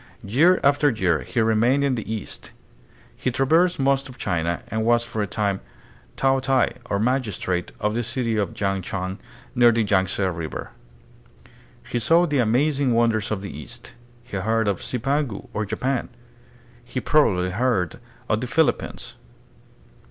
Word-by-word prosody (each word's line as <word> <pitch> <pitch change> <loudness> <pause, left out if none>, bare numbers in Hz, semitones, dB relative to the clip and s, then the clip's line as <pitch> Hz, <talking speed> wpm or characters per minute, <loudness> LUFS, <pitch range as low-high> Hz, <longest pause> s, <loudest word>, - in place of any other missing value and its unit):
Year 160 - +4
after 145 +1 +4
year 95 - +1
he 120 - -2
remained 115 +5 +3
in 140 -2 +2
the 110 -2 -4
East. 110 -3 -6 0.6
He - - -1
traversed 160 +8 +2
most 135 0 +1
of 125 - -12
China, 85 -3 -1
and 110 0 -1
was 120 +1 +3
for 110 -2 -4
a 100 - -1
time 100 -1 -1 0.6
"taotai," 135 -2 +2
or 100 - +1
magistrate, 105 -6 -1
of 105 0 0
the 120 - 0
city 115 -1 -1
of 100 -4 -2
Yang 100 -1 0
Chan 95 +1 -4 0.3
near 120 -2 +6
the 115 -1 +1
Yangtze 95 -1 +1
River. 85 -4 -4 1.2
He 120 - -1
saw 165 +9 +4
the 145 -5 0
amazing 130 +2 +2
wonders 115 -2 +2
of 100 -2 -3
the 100 - -7
East. 75 - -9 0.3
He 120 -4 -6
heard 110 +3 0
of 100 -3 0
"Zipangu," 135 -2 -2
or 110 -1 -2
Japan. 125 +5 -2 0.7
He 125 +1 -4
probably 95 -12 +2
heard 105 -5 0 0.3
of 110 +1 0
the 125 - -3
Philippines. 160 +5 0
115 Hz, 150 wpm, -23 LUFS, 100-135 Hz, 1.2 s, near